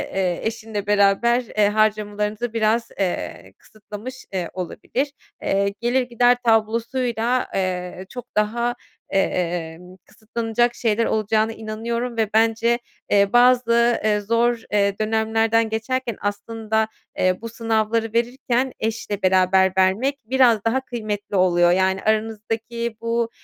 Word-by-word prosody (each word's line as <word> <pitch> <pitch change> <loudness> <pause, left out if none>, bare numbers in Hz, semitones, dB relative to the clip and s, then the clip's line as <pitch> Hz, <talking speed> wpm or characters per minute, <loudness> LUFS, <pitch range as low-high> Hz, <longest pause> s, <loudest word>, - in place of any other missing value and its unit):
eee, 180 -3 0
eşinle 220 -2 -5
beraber, 205 +4 +3
eee, 210 -2 +1
harcamalarınızı 210 +1 0
biraz, 225 +1 +1
eee, 185 -2 -3
kısıtlamış, 215 +4 -10
eee, 180 -3 -2
olabilir. 240 - -3 0.3
Eee, 200 +1 0
gelir 240 +2 +1
gider 245 0 +3
tablosuyla, 235 +2 +1
eee, 185 -1 -3
çok 245 -2 -10
daha, 235 +3 +1 0.3
emm, 180 -2 -2
kısıtlanacak 230 +2 -1
şeyler 230 -1 +1
olacağına 215 +1 +1
inanıyorum 230 +2 -4
ve 220 -2 +1
bence, 225 +2 +2 0.3
eee, 200 +1 +3
bazı, 240 -1 +4
eee, 210 -1 +2
zor, 230 +2 +1
eee, 200 -1 +1
dönemlerden 225 +1 +1
geçerken 235 +1 -2
aslında, 220 +2 -1 0.3
eee, 185 +1 +1
bu 230 - -6
sınavları 225 0 -1
verirken 245 +2 0
eşle 215 -2 -3
beraber 190 0 +4
vermek 195 +9 +2
biraz 240 -3 +3
daha 255 +4 +1
kıymetli 215 -5 -5
oluyor. 175 -2 +4
Yani, 190 +1 +2
aranızdaki 225 +1 -2
bu, 230 0 0
220 Hz, 120 wpm, -22 LUFS, 205-235 Hz, 0.3 s, bazı